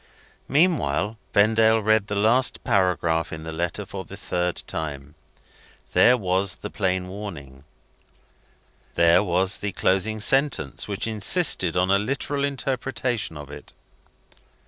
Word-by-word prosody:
Meanwhile, 115 - +1
Vendale 110 +2 +4
read 110 -1 +2
the 100 - -3
last 115 +5 +2
paragraph 85 -4 +1
in 80 0 -7
the 80 - -6
letter 85 +5 -3
for 95 0 -7
the 100 - -11
third 90 -2 -3
time. 75 -4 -6 0.8
There 125 +1 +5
was 95 -2 0
the 105 - -8
plain 95 -2 -1
warning 80 -10 -9 1.3
there 85 +1 +5
was 95 0 0
the 100 -1 -4
closing 95 +5 0
sentence, 135 - 0
which 100 -2 -3
insisted 105 - +2
on 90 +1 +2
a 100 - +4
literal 140 +5 -2
interpretation 130 - -2
of 75 -1 -10
it. 75 0 -12
100 Hz, 125 wpm, -24 LUFS, 85-110 Hz, 1.3 s, There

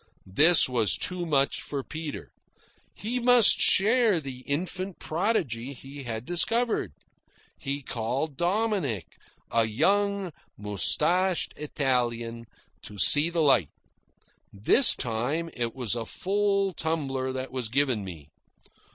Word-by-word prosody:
This 160 - +6
was 115 -8 +2
too 180 -1 -3
much 140 -3 0
for 140 -2 -5
Peter. 155 0 -8 0.6
He 235 +4 -3
must 245 -2 +5
share 215 -1 +4
the 135 -4 -8
infant 185 +5 -4
prodigy 155 - -2
he 135 +2 -11
had 115 0 -5
discovered. 225 - 0 0.7
He 140 0 -5
called 130 +6 -4
Dominick, 175 - -1 0.5
a 115 -1 +2
young 195 - 0 0.2
moustached 160 - 0
Italian, 120 -5 -3 0.3
to 105 - -12
see 145 - +5
the 165 -2 0
sight. 115 - +3 0.8
This 105 - +6
time 135 +8 -3
it 120 -2 -4
was 125 -6 -2
a 115 -2 -4
full 200 0 -1
tumbler 135 -6 -3
that 130 0 -5
was 125 -4 -4
given 130 -4 0
me. 80 -6 -11
145 Hz, 115 wpm, -26 LUFS, 120-185 Hz, 0.8 s, This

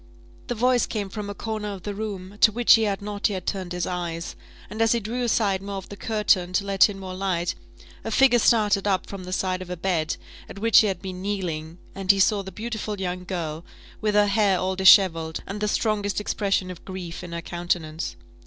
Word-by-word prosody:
The 245 - -2
voice 250 +2 +2
came 205 -3 -3
from 205 0 -6
a 205 - -5
corner 215 -1 -4
of 190 -3 -8
the 205 - -4
room, 200 -1 -6
to 215 - +7
which 240 +2 +5
he 225 -1 +4
had 200 -1 -2
not 205 +1 -1
yet 185 -3 -4
turned 185 -3 -3
his 180 -1 -2
eyes: 170 -2 -4 0.3
and 215 +3 -5
as 225 0 +4
he 235 - +1
drew 230 +4 -4
aside 210 -5 +1
more 200 0 -5
of 195 - -7
the 205 - -7
curtain, 200 -4 +1
to 200 +2 +1
let 195 +1 +4
in 200 - -6
more 190 -1 -7
light, 185 -2 -1 0.5
a - - -4
figure 245 +1 +5
started 210 -4 +3
up 190 -2 +1
from 195 -2 -8
the 180 - -7
side 185 0 -1
of 185 - -8
a 180 - -4
bed, 165 -3 -1 0.3
at - - -9
which 225 +1 +4
she 215 - +7
had 190 -2 -3
been 185 -1 -6
kneeling, 175 -5 -3 0.2
and 195 -1 -7
he 200 -1 +6
saw 200 +1 +3
the 190 0 -8
beautiful 220 -2 -4
young 180 -1 -3
girl, 165 -3 -4 0.4
with 210 -1 0
her 210 0 +6
hair 200 -2 +3
all 185 +1 -1
dishevelled, 180 -4 +5
and 205 +2 -6
the 210 - +1
strongest 210 -2 0
expression 195 -3 -1
of 175 - -11
grief 180 -3 -7
in 175 - -8
her 170 0 -4
countenance. 170 -2 -3
195 Hz, 225 wpm, -24 LUFS, 180-210 Hz, 0.5 s, to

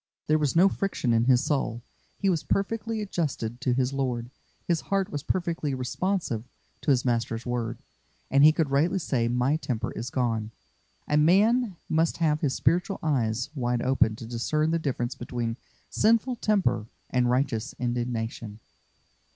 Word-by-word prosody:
There 155 0 +3
was 150 -1 0
no 180 +4 +7
friction 195 -11 -1
in 115 0 +3
his 125 +1 +4
soul. 130 -6 -1 0.3
He 200 - -1
was 170 -5 +2
perfectly 225 +2 -1
adjusted 135 - -3
to 125 - +1
his 130 +1 0
Lord; 125 -3 -2 0.4
his 170 -2 +1
heart 195 -1 -1
was 145 - -3
perfectly 165 -4 -1
responsive 130 - -2 0.4
to - - -2
his 130 -3 +3
Master's 115 -1 -1
word, 120 -1 -2 0.5
and 140 +1 +5
he 155 - +9
could 155 -3 -1
rightly 165 +7 +2
say, 130 -9 0
"My 125 +5 +1
temper 120 -6 -3
is 120 +3 -5
gone." 115 -5 -1 0.6
A 150 - +2
man 200 +7 +4
must 160 +1 +1
have 155 -2 +1
his 135 -5 0
spiritual 175 - +1
eyes 125 -6 0
wide 120 -4 -1
open 125 -4 +2
to 115 - -9
discern 150 +7 0
the 165 - +1
difference 130 -5 -2
between 120 -2 -4 0.4
sinful 230 +3 +2
temper 185 - +1 0.2
and 125 -1 +2
righteous 125 -1 0
indignation. 120 -3 -3
135 Hz, 160 wpm, -27 LUFS, 120-165 Hz, 0.6 s, he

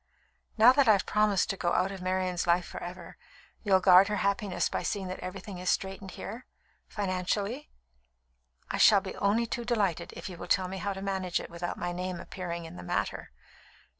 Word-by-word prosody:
"Now 225 +3 +8
that 270 -1 +3
I've 205 -3 +5
promised 210 -3 +2
to 195 - -5
go 175 -2 0
out 190 +1 +1
of 195 -2 -7
Marian's 185 -1 -1
life 175 +1 +3
for - - -8
ever, 175 +1 -8 0.4
you'll 195 -3 +4
guard 185 +1 +7
her 210 - -1
happiness 200 -1 0
by - - -3
seeing 200 -2 -2
that 185 - -5
everything 185 +1 -7
is 180 - -2
straightened 190 0 -2
here 240 +3 -7 0.4
financially?" 200 +6 -2 1.0
"I - - -2
shall 205 -3 +7
be 190 -1 -7
only 215 +4 +2
too 235 +1 -4
delighted, 210 -8 0
if - - -7
you 180 -3 -8
will - - -7
tell 185 -1 +2
me 190 +1 -5
how 200 +2 -2
to 195 0 -7
manage 190 -2 -1
it - - -9
without 170 +1 -4
my 175 - -3
name 180 0 -4
appearing 170 -2 -6
in 90 - -10
the - - -7
matter." - - -2
190 Hz, 195 wpm, -29 LUFS, 180-205 Hz, 1.0 s, Now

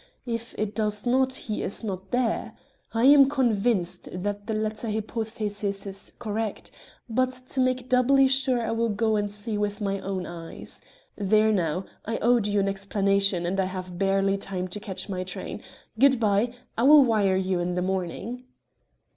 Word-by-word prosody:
If 235 -1 -4
it 215 -1 -2
does 210 -1 0
not, 260 +2 +3
he 220 -4 -3
is 200 - -2
not 190 -2 -5
there. 230 -2 -1 0.3
I 225 0 0
am 275 -1 +8
convinced 230 -8 0
that 205 +3 -4
the 220 - -1
latter 215 +1 -2
hypothesis 210 -2 -3
is 195 0 -5
correct, 220 -2 -4 0.4
but 255 +2 +1 0.2
to 270 - -2
make 255 -1 +1
doubly 265 +2 +4
sure 260 -3 +2
I 225 - -1
will 230 0 0
go 220 +1 +1
and 205 -1 -1
see 210 +1 -4
with 205 0 -1
my 195 -2 -1
own 190 -1 -3
eyes. 165 -1 -7 0.3
There 215 +2 +3
now 180 -2 0 0.2
I 225 +1 -2
owed 235 -2 +3
you 205 0 +1
an 195 - +1
explanation, 195 -2 +1
and 190 +3 -1
I 190 - +2
have 185 -1 -6
barely 195 0 +2
time 185 -2 -4
to 210 - -6
catch 200 -1 -5
my 185 -2 -3
train. 185 - -6 0.4
Good 270 -1 +5
bye. 215 +2 +2 0.2
I - - -1
will 290 +3 +8
wire 205 -5 +2
you 190 -1 0
in 175 0 -1
the 180 - 0
morning." 190 +7 -3
210 Hz, 175 wpm, -26 LUFS, 195-235 Hz, 0.4 s, am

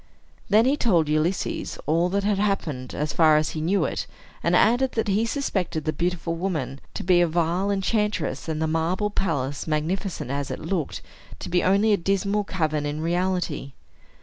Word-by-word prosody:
Then 215 +3 +5
he 270 +3 +3
told 180 - +2
Ulysses 155 +5 -1
all 165 +3 +2
that 200 +2 0
had 205 -1 +1
happened, 155 -11 -1
as 150 0 -2
far 155 -2 +5
as 155 0 +1
he 155 - -4
knew 190 +5 +2
it, - - -3 0.3
and - - +2
added 250 +3 +3
that 225 -2 -1
he 215 +4 +2
suspected 190 - -2
the 155 - 0
beautiful 175 -1 -1
woman 160 -7 -3 0.2
to - - -4
be 175 -1 +4
a 175 - +4
vile 170 +4 0
enchantress, 200 - -1
and 155 -1 -2
the 160 - +1
marble 165 +6 0
palace, 145 -9 -2
magnificent 160 - -2
as 140 0 -2
it - - -3
looked, 175 -7 -3 0.3
to - - -7
be 180 0 +2
only 200 +3 +4
a - - +4
dismal 200 +3 0
cavern 155 -6 -1
in 145 +1 -3
reality. 175 -4 -1
175 Hz, 180 wpm, -24 LUFS, 155-200 Hz, 0.3 s, Then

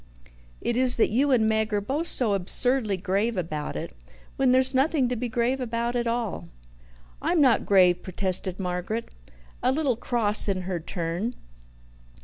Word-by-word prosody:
"It 240 - -2
is 255 0 +8
that 225 - +1
you 270 +6 +1
and 235 -5 +3
Meg 220 0 0
are 205 - +1
both 280 +11 -3
so 230 -10 +3
absurdly 210 +3 0
grave 200 +4 -1
about 155 -4 -4
it, - - -6 0.4
when 265 -2 +2
there's 260 +1 +2
nothing 270 0 +1
to 250 - -2
be 245 +1 -4
grave 240 +3 -1
about 235 0 -2
at 240 -1 -1
all." 230 - -3 0.7
"I'm 345 - 0
not 260 -6 +3
grave," 180 -3 +4
protested 185 0 -2
Margaret, 180 +5 -4 0.5
a 255 - +2
little 275 -3 0
cross 220 -3 +1
in 190 -2 -1
her 180 -1 -3
turn. 175 +8 -4
230 Hz, 160 wpm, -25 LUFS, 190-250 Hz, 0.7 s, is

